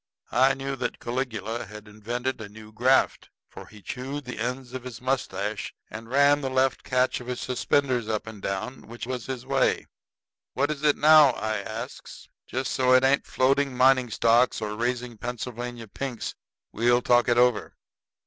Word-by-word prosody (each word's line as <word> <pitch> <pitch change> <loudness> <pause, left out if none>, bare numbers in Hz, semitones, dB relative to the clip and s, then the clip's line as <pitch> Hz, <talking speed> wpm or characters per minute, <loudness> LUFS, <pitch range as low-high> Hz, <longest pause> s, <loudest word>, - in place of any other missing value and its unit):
I 130 +3 +4
knew 135 0 -4
that 120 -1 -3
Caligula 120 -3 -3
had 105 +1 -11
invented 120 +4 -4
a 105 - -7
new 110 +1 -13
graft. 125 +4 +2 0.2
For - - -12
he 105 -2 -15
chewed 135 +3 -5
the 125 - -7
ends 125 0 -4
of 130 -1 -5
his 125 -3 -8
mustache 110 -6 -2 0.2
and 115 +1 -8
ran 140 +2 +4
the 135 - -2
left 130 0 +1
catch 125 0 +1
of 125 - -11
his 125 -1 -3
suspenders 130 -2 0
up 110 -1 -1
and 110 -3 -10
down, 100 +8 -4
which 115 -1 -7
was 125 -2 -5
his 130 -2 -5
way. - - +1 0.7
"What 140 +3 +1
is 145 -2 -5
it 150 -1 +3
now?" 155 -3 +7
I 110 -1 -2
asks. 110 +3 -7 0.2
"Just 130 +1 -3
so 130 -1 +3
it 130 - +6
ain't 135 +1 +3
floating 135 0 +1
mining 130 -1 +4
stocks 115 +3 +3
or 105 -1 -4
raising 120 0 -3
Pennsylvania 120 0 -5
pinks, 125 +3 -5 0.4
we'll 120 +1 +2
talk 120 0 +4
it 120 - +3
over." 125 -2 +2
125 Hz, 175 wpm, -26 LUFS, 115-130 Hz, 0.7 s, now